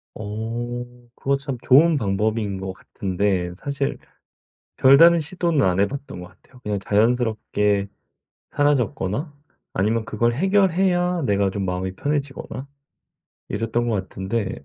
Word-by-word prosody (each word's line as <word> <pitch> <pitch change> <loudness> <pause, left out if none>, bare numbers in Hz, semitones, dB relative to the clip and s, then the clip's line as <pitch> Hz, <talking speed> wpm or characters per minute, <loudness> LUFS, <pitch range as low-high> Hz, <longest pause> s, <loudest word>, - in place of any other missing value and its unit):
어 115 +3 -4 0.3
그거 140 +1 0
참 140 -2 -5
좋은 155 +5 +5
방법인 105 -2 -1
것 95 0 -5
같은데 95 -2 -2
사실 140 +6 -3 0.8
별다른 165 +6 +7
시도는 170 -2 0
안 90 0 +1
해 100 - +4
봤던 135 -6 -7
거 90 - -8
같아요. 125 +6 -21
그냥 105 -1 -2
자연스럽게 105 -2 +1 0.6
사라졌거나 140 - 0 0.4
아니면 110 +4 +1
그걸 115 +1 0
해결해야 180 +1 +2
내가 100 -3 +1
좀 100 0 -3
마음이 95 +1 -3
편해지거나 140 -1 -3 0.8
이랬던 115 +1 -1
것 115 - +1
같은데 95 -3 -3
115 Hz, 280 characters per minute, -22 LUFS, 100-140 Hz, 0.8 s, 별다른